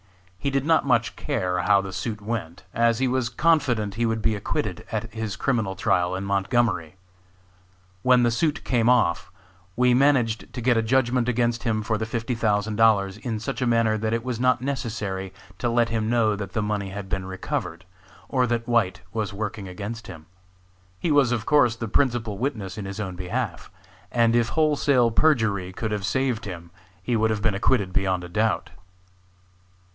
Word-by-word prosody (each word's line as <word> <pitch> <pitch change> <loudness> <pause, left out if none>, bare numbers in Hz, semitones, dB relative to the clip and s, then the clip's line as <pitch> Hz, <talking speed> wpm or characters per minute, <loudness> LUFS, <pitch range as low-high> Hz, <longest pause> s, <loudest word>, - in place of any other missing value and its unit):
He 140 - -1
did 135 0 0
not 160 0 +4
much 120 -3 +2
care 90 -1 -1
how 100 +2 +4
the 95 -1 -7
suit 105 +3 -4
went, 100 -6 -5
as 115 -1 +2
he 130 +1 +1
was 125 -1 0
confident 125 -7 +1
he 115 +3 0
would 110 -1 -2
be 110 - +2
acquitted 100 - -3
at 110 0 -3
his 110 -2 -4
criminal 110 -8 -1
trial 90 0 +1
in 95 - -4
Montgomery. 100 -4 0 1.1
When 125 +1 +4
the 120 - +3
suit 150 +5 0
came 120 -2 +2
off, 85 -11 +2 0.4
we 125 +1 +4
managed 125 -4 +2
to 125 - -6
get 120 0 +3
a - - +3
judgment 125 +1 +1
against 120 -1 +1
him 110 -3 -1
for 110 +1 -1
the 110 - -2
fifty 115 +2 -2
thousand 105 -2 0
dollars 100 -4 +3
in 115 -4 -4
such 110 - -4
a 125 - +1
manner 115 -2 +3
that 110 +1 -1
it 115 0 -1
was 125 -3 -3
not 125 0 +2
necessary 110 -8 -3 0.3
to 120 - 0
let 120 0 +2
him 110 -1 -1
know 115 -3 +2
that 100 -2 -6
the 110 - 0
money 105 -2 -2
had 100 0 -6
been 95 -1 -3
recovered, 90 -2 -4 0.4
or 130 -2 +1
that 115 -1 -1
White 115 -6 +1
was 105 -3 -2
working 100 -1 -4
against 105 +5 -6
him. 80 -3 -10 0.7
He 160 - -1
was 140 -4 +4
of 115 -3 -1
course 135 -6 +4
the 115 0 -5
principal 115 -3 0
witness 110 -8 -3
in 100 - -5
his 95 +2 -6
own 95 -4 -4
behalf, 95 +2 -4 0.4
and 115 -1 +3
if 120 -1 +2
wholesale 145 -6 +2
perjury 110 -10 +2
could 110 +3 -4
have 105 -1 -2
saved 125 +1 0
him 85 -3 -8 0.3
he 120 +5 0
would 110 0 +2
have 105 -2 -2
been - - +2
acquitted 100 -2 +1
beyond 95 -1 0
a 90 - -8
doubt. 110 +4 0
110 Hz, 190 wpm, -24 LUFS, 100-120 Hz, 1.1 s, not